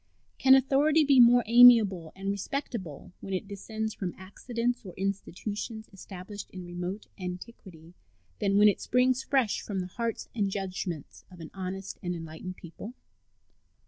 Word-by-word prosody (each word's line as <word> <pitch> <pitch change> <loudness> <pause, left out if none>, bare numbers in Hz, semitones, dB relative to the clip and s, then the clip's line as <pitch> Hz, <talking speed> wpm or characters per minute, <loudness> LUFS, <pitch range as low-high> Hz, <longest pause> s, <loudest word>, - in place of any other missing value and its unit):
Can 265 0 +7
authority 285 +4 +3
be 275 -2 +5
more 245 0 +7
amiable 225 -8 +6
and 195 +1 -3
respectable 200 - -5
when 195 -1 -4
it 185 - -4
descends 220 +2 -5
from 185 -3 -5
accidents 235 +6 -3
or 185 -4 -10
institutions 205 +3 -4
established 195 +1 -9
in 185 -1 -9
remote 175 +4 -5
antiquity 180 -2 -9 0.5
than 200 0 +1
when 210 +1 +7
it 205 - +2
springs 250 +1 +2
fresh 265 -7 +1
from 200 -2 -4
the 180 - -3
hearts 230 +5 -4
and 205 -4 0
judgments 185 -5 -5
of 180 -2 -14
an 160 - -9
honest 190 0 -6
and 175 -2 -3
enlightened 165 +2 -7
people? 205 +8 -10
200 Hz, 145 wpm, -28 LUFS, 185-235 Hz, 0.5 s, Can